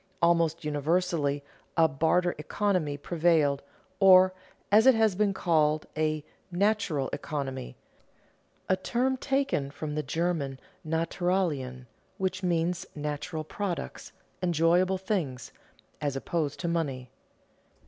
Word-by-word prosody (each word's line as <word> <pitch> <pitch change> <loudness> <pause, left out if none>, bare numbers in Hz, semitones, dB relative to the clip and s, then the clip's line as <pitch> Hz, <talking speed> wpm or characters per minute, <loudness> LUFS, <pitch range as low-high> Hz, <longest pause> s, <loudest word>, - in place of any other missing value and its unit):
Almost 170 -2 +2
universally 150 -1 0 0.3
a 165 -1 +6
"barter 165 +4 +1
economy" 160 -3 0
prevailed, 155 -3 +2 0.4
or, 185 -1 +7 0.4
as 220 +4 +6
it 260 - +8
has 220 -2 +3
been 205 +2 +2
called, 155 -5 +2
a 155 -1 0 0.3
"natural 185 -7 +1
economy," 135 - -4 0.9
a 185 - +3
term 245 +7 0
taken 270 - 0
from 150 +1 -5
the 150 - -1
German 150 -2 -2 0.2
"Naturalien," 160 -5 -1 0.3
which 190 -1 -2
means 175 -1 0
natural 150 +2 -4
products, 180 +2 -5 0.3
enjoyable 175 +2 +3
things, 175 - -3 0.5
as 145 -2 -1
opposed 150 +1 -2
to 175 - -2
money. 140 -7 -2
165 Hz, 105 wpm, -28 LUFS, 145-185 Hz, 0.9 s, it